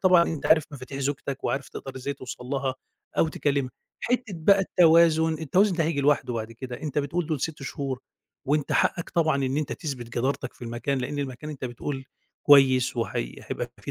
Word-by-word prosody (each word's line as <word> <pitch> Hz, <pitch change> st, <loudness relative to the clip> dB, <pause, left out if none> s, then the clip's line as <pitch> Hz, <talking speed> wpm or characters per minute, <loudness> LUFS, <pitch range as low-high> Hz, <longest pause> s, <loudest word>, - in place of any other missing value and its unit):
طبعًا 185 Hz, -3 st, +6 dB
أنت 160 Hz, -4 st, -3 dB
عارف 160 Hz, -1 st, +5 dB
مفاتيح 135 Hz, 0 st, -7 dB
زوجتك، 140 Hz, 0 st, -3 dB
وعارف 135 Hz, 0 st, -1 dB
تقدر 135 Hz, -1 st, -8 dB
إزاي 135 Hz, +2 st, -3 dB
توصل 130 Hz, -2 st, -8 dB
لها، 135 Hz, -1 st, -1 dB, 0.4 s
أو 160 Hz, -, +4 dB
تكلمها، 140 Hz, -3 st, 0 dB, 0.3 s
حتّة 250 Hz, 0 st, +1 dB
بقى 195 Hz, +5 st, +5 dB
التوازن، 165 Hz, -3 st, +5 dB
التوازن 180 Hz, +5 st, +2 dB
ده 165 Hz, -, +2 dB
هييجي 155 Hz, -2 st, 0 dB
لوحده 140 Hz, -3 st, +2 dB
بعد 110 Hz, 0 st, -4 dB
كده، 125 Hz, +1 st, -7 dB
أنت 150 Hz, -1 st, -2 dB
بتقول 155 Hz, +4 st, -1 dB
دول 155 Hz, -4 st, -2 dB
6 150 Hz, -1 st, -3 dB
شهور، 135 Hz, -1 st, -4 dB, 0.5 s
وأنت 145 Hz, +1 st, +1 dB
حقك 170 Hz, -, +1 dB
طبعًا 160 Hz, -4 st, +2 dB
إن 130 Hz, +2 st, -1 dB
أنت 150 Hz, -1 st, -1 dB
تثبت 135 Hz, -7 st, -5 dB
جدارتك 130 Hz, +4 st, -1 dB
في -, -, -17 dB
المكان، 120 Hz, +4 st, -2 dB
لأن 135 Hz, +3 st, -3 dB
المكان 140 Hz, +2 st, -4 dB
أنت 140 Hz, -3 st, -7 dB
بتقول 135 Hz, +3 st, -5 dB, 0.4 s
كويس، 130 Hz, -3 st, +6 dB
وهي 85 Hz, -, -2 dB
هيبقى -, -, -5 dB
في -, -, -6 dB
140 Hz, 185 wpm, -26 LUFS, 130-160 Hz, 0.5 s, طبعًا